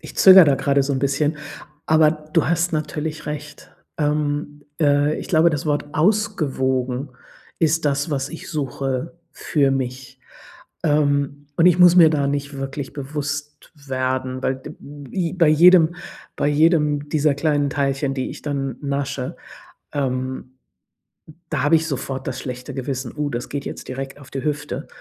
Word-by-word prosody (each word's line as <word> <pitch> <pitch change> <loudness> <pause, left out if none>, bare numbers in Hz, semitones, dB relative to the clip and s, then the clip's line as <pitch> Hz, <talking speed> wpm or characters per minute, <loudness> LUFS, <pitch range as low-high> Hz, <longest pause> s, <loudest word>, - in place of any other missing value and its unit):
ich - - -11
zögere 190 -1 +9
da 145 -3 +3
gerade 140 +1 +1
so 140 - -1
'n 135 - 0
bisschen. 145 +3 0 0.5
Aber 155 -1 +5
du 155 0 -1
hast 175 0 +1
natürlich 155 0 -3
recht. 150 -1 -7 0.3
Ähm, 145 -1 -1 0.2
äh, 145 0 +3
ich - - -7
glaube, 170 0 +4
das 150 -1 -3
Wort 145 -1 0
ausgewogen 140 - 0 0.5
ist 165 0 +1
das, 145 +2 0
was 135 -1 -1
ich 165 - -9
suche 135 0 -3 0.2
für 140 -3 +1
mich. 130 0 -4 0.7
Ähm, 145 -1 +1
und 165 - +4
ich 180 -1 +5
muss 180 0 +7
mir 165 -3 +8
da 145 -3 +1
nicht 145 0 -3
wirklich 135 0 -5
bewusst 145 +1 -5
werden, 130 -2 -3
weil 130 - 0
d 130 - -10
bi 145 +5 -5
bei 170 -4 +3
jedem 170 +1 +6 0.4
bei 145 - +1
jedem 150 -1 +2
dieser 150 -2 +2
kleinen 145 -1 0
Teilchen, 135 0 -1
die 130 -1 -3
ich - - -10
dann 135 -4 -3
nasche, 140 -2 -3 0.6
ähm, 130 -2 -3 1.0
da - - -1
habe 150 +3 +4
ich 160 0 +1
sofort 135 -2 -4
das 130 - -3
schlechte 125 -1 -6
Gewissen: 130 -1 -4
„Oh, 150 -1 -2
das 120 -2 -4
geht 140 -1 -4
jetzt - - -7
direkt 135 +2 -6
auf 140 -2 -15
die 135 - -4
Hüfte.” 145 -2 -3
145 Hz, 160 wpm, -21 LUFS, 135-155 Hz, 1.0 s, zögere